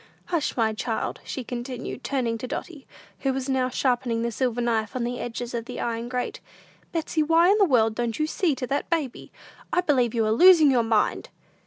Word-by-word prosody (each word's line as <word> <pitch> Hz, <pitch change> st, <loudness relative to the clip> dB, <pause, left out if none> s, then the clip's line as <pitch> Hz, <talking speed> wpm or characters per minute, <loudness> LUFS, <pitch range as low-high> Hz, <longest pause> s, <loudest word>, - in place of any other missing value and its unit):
"Hush, 335 Hz, -7 st, -1 dB
my 220 Hz, -2 st, +2 dB
child," 220 Hz, +1 st, -3 dB
she 260 Hz, -, -5 dB
continued, 245 Hz, +1 st, -6 dB
turning 240 Hz, -5 st, -1 dB
to 255 Hz, -, -5 dB
Dotty, 295 Hz, +2 st, -6 dB, 0.3 s
who 270 Hz, -, 0 dB
was 265 Hz, 0 st, -3 dB
now 260 Hz, -1 st, +1 dB
sharpening 245 Hz, -3 st, 0 dB
the 235 Hz, -, -1 dB
silver 245 Hz, 0 st, -1 dB
knife 225 Hz, -2 st, -1 dB
on 250 Hz, -, -1 dB
the 245 Hz, +1 st, -3 dB
edges 240 Hz, 0 st, -5 dB
of 230 Hz, -1 st, -3 dB
the -, -, -7 dB
iron 235 Hz, 0 st, -3 dB
grate. 250 Hz, -1 st, -3 dB, 0.5 s
"Betsey, 325 Hz, -1 st, -1 dB
why 330 Hz, +4 st, +4 dB
in 420 Hz, -, +3 dB
the 400 Hz, -, +6 dB
world 225 Hz, -8 st, +3 dB
don't 235 Hz, 0 st, -2 dB
you 305 Hz, -, +1 dB
see 315 Hz, -1 st, 0 dB
to 255 Hz, -, -4 dB
that 275 Hz, +3 st, -2 dB
baby? 310 Hz, -7 st, -2 dB, 0.4 s
I 360 Hz, -, +2 dB
believe 255 Hz, -8 st, +1 dB
you 225 Hz, -1 st, +2 dB
are 215 Hz, -, +1 dB
losing 320 Hz, +2 st, +7 dB
your 250 Hz, -2 st, +3 dB
mind!" 225 Hz, -2 st, 0 dB
250 Hz, 205 wpm, -25 LUFS, 235-285 Hz, 0.5 s, losing